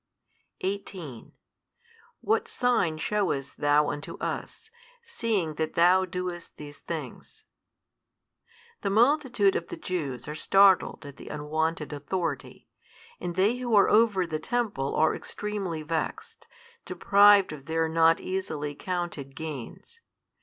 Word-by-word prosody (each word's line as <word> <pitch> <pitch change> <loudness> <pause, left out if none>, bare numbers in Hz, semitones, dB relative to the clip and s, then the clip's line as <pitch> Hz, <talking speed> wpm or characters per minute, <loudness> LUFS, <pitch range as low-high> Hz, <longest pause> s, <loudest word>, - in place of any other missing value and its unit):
18 185 - -5 0.9
What 435 - +1
sign 230 -11 +1
shewest 180 -6 -1
Thou 145 +1 +3
unto 145 0 -7
us, 450 0 -5 0.3
seeing 225 - -1
that 155 - -2
Thou 180 +2 +5
doest 180 -1 -6
these 145 -1 -10
things? - - -8 1.4
The - - -1
multitude 235 -2 +3
of 170 - -2
the - - -7
Jews 140 -9 -4
are 150 - -4
startled 195 0 +3
at 140 -1 -10
the - - -12
unwonted 155 +1 -2
authority, 160 0 -4 0.5
and 175 -1 -4
they 200 +6 +2
who 245 -3 0
are 200 - +6
over 210 -4 +4
the 155 -2 -3
temple 200 - -2
are 160 0 +3
extremely 195 -7 -5
vexed, 160 +1 -4 0.4
deprived 200 0 +5
of 140 -2 -11
their 165 0 +1
not 165 0 +4
easily 155 -6 -3
counted 175 -5 -5
gains. 160 - -8
175 Hz, 120 wpm, -27 LUFS, 155-200 Hz, 1.4 s, are